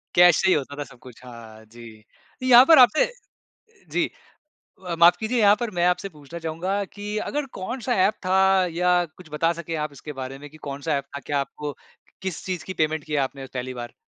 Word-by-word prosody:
Cash 175 -1 +7
से 190 - +2
ही 185 - +5
होता 145 -1 -2
था - - -2
सब 125 -2 -17
कुछ। 125 -1 -15
हाँ 110 -2 -12
जी, 110 -1 -14 0.4
यहाँ 255 0 +8
पर 320 -2 +7
आपने 255 +5 +6 0.9
जी। - - +1 0.8
अ, 170 - -2
माफ़ 170 +1 +7
कीजिए 230 +2 -1
यहाँ 205 -1 +6
पर 235 -2 -3
मैं 175 - +3
आपसे 180 +2 0
पूछना 155 0 -11
चाहूँगा 170 +5 -2
कि 205 +1 -5
अगर 295 0 -2
कौन-सा 240 +6 -3
ऐप 210 - +2
था 190 0 +4
या 180 +1 +2 0.2
कुछ 180 -4 -14
बता 165 +2 +1
सके 165 -1 -5
आप 150 - -8
इसके 150 +2 -9
बारे 130 +1 -6
में 145 +1 -11
कि 155 - -16
कौन-सा 145 +1 -3
ऐप 140 - -5
था, - - -4
क्या 145 -1 -2
आपको 145 +1 -5 0.5
किस 190 -3 -5
चीज़ 185 -2 -4
की 190 - -5
पेमेंट 155 -2 -1
की 155 - -8
है 145 - +2
आपने 135 0 -3
पहली 130 0 -4
बार? 120 -1 -8
165 Hz, 215 wpm, -24 LUFS, 140-190 Hz, 0.9 s, यहाँ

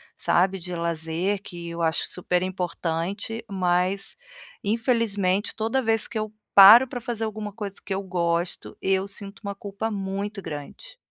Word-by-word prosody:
sabe, 190 +2 +2
de 180 +1 -6
lazer, 170 +3 -1
que 170 -3 -8
eu 170 0 -5
acho 160 -2 +1
super 180 0 -1
importante, 185 +4 -3
mas, 185 +1 0 0.5
infelizmente, 205 -3 +1
toda 225 +4 0
vez 225 -1 +2
que 240 - -5
eu 215 0 -3 0.2
paro 215 +6 +10
pra 250 -1 -5
fazer 230 -1 -4
alguma 215 -1 -4
coisa 200 -2 -5
que 195 - -2
eu 190 - -1
gosto, 175 -2 -2
eu 190 0 +1
sinto 200 +1 -8
uma 200 -2 -4
culpa 200 +2 -4
muito 200 +1 -3
grande. 165 - -8
195 Hz, 150 wpm, -25 LUFS, 180-215 Hz, 0.5 s, paro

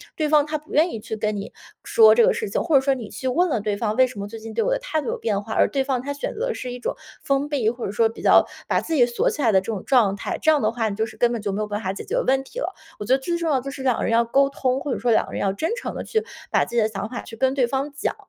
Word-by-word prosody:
对 310 -3 0
方 300 -1 +4
她 310 0 -2
不 305 +2 -17
愿 315 +4 +4
意 225 - -5
去 220 - -5
跟 215 -1 -1
你 200 - -6 0.3
说 450 -2 +6
这 470 - +6
个 - - +3
事 455 -2 -3
情， - - -1
或 320 - +1
者 270 - +7
说 275 0 +2
你 230 -5 -7
去 260 - -5
问 345 +8 +2
了 230 -7 0
对 210 -1 -1
方：” 215 0 -1
为 260 0 +5
什 225 -5 -10
么 200 - -4
最 225 +2 -9
近 220 0 -8
对 - - +1
我 - - 0
的 - - +1
态 320 -11 -2
度 275 - -7
有 - - -2
变 205 -3 -1
化？ 220 - -6
“而 - - +4
对 270 -1 0
方 265 -3 -1
她 285 +2 -4
选 285 - -4
择 - - -2
的 485 - -1
是 250 -1 -5
一 250 - -7
种 - - -3 0.3
封 275 +1 +1
闭， 265 -7 +1
或 240 +1 -5
者 195 - -3
说 225 +1 +2
比 225 - -10
较 - - +6 0.2
把 - - +1
自 325 - -4
己 245 -4 +5
锁 240 -1 0
起 295 - -4
来 230 - +3
的 190 -2 +4
这 - - -15
种 215 -4 -4
状 230 -8 +3
态， 200 - -4
这 315 - +3
样 300 -2 +2
的 - - +1
话 230 -2 -1
你 200 - -4
就 220 +1 0
是 220 - -11
根 240 -1 +3
本 235 -3 -3
就 205 - -2
没 205 +2 -2
有 210 - -2
办 205 +1 -3
法 190 -1 -2
解 - - -7
决 - - -1
问 265 +1 +1
题 480 - -8
了。 385 - -3 0.3
我 210 - -5
觉 255 - +2
得 270 - -2
最 340 +5 -1
重 335 -1 -1
要 275 - +3
的 - - -2
就 275 - -6
是 270 -1 -7
2 255 -3 +2
个 - - -2
人 - - 0
要 235 +1 +3
沟 275 +4 +3
通， 265 -1 -1
或 285 -1 -4
者 - - -3
说 240 - +1
2 - - +3
个 - - -12
人 - - -3
要 195 -1 +1
真 315 +11 -2
诚 - - -5
地 - - -4
去 440 0 -1 0.3
把 - - +3
自 240 - -8
己 235 - +4
的 215 - +3
想 215 0 -4
法 245 - -5
去 225 - -11
跟 265 +3 +1
对 255 -4 +2
方 275 +3 -2
讲， 280 - -2
255 Hz, 385 characters per minute, -23 LUFS, 220-290 Hz, 0.3 s, 者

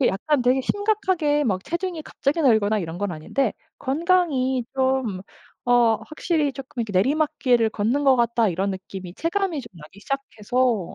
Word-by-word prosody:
그 260 - +4
약간 270 +9 0
되게 250 +2 +3
심각하게 375 -7 +1
막 190 -6 0
체중이 340 +1 -3
갑자기 295 +2 -1
늘거나 220 -5 +3
이런 165 -3 -5
건 205 -2 -2
아닌데 200 - -1 0.3
'건강이 275 -4 +1
좀 260 -7 0 0.5
어 240 -2 +5
확실히 310 -2 -1
쪼끔 260 -2 -7
이렇게 220 -2 -6
내리막길을 255 -1 +2
걷는 230 +8 0
것 270 -1 +6
같다.' 235 -2 +2
이런 190 +2 -1
느낌이 190 -1 -7
체감이 340 - -1
좀 250 - -12
나기 160 +5 -14
시작해서. 245 -4 -1
255 Hz, 345 characters per minute, -23 LUFS, 210-295 Hz, 0.5 s, 것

